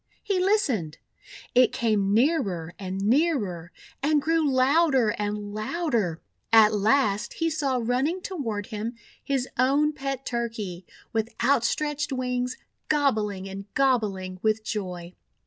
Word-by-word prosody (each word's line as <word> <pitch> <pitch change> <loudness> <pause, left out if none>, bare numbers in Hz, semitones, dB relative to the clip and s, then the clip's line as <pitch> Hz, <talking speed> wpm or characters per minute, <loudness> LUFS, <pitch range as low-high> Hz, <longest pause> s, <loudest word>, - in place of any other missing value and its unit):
He 395 -3 0
listened. 280 - +1 0.6
It 250 -1 +5
came 210 -4 +1
nearer 205 - +1
and 190 0 -4
nearer, 215 - +1 0.3
and 300 +2 +3
grew 320 0 +1
louder 265 -2 +3
and 205 0 -3
louder. 215 - -1 0.3
At 220 -1 +7
last 210 0 +2
he 330 -1 -1
saw 275 -5 0
running 255 +9 0
toward 230 - -3
him 220 +3 -4 0.3
his 270 -2 -1
own 285 +4 +3
pet 275 -2 -4
Turkey, 220 -7 -4 0.3
with 225 0 0
out 270 -4 +3
stretched 295 +2 -1
wings, 250 -1 -2 0.3
gobbling 215 -10 +1
and 195 +1 -8
gobbling 205 -9 +1
with 215 0 +1
joy. 180 -5 -5
235 Hz, 125 wpm, -26 LUFS, 205-280 Hz, 0.6 s, At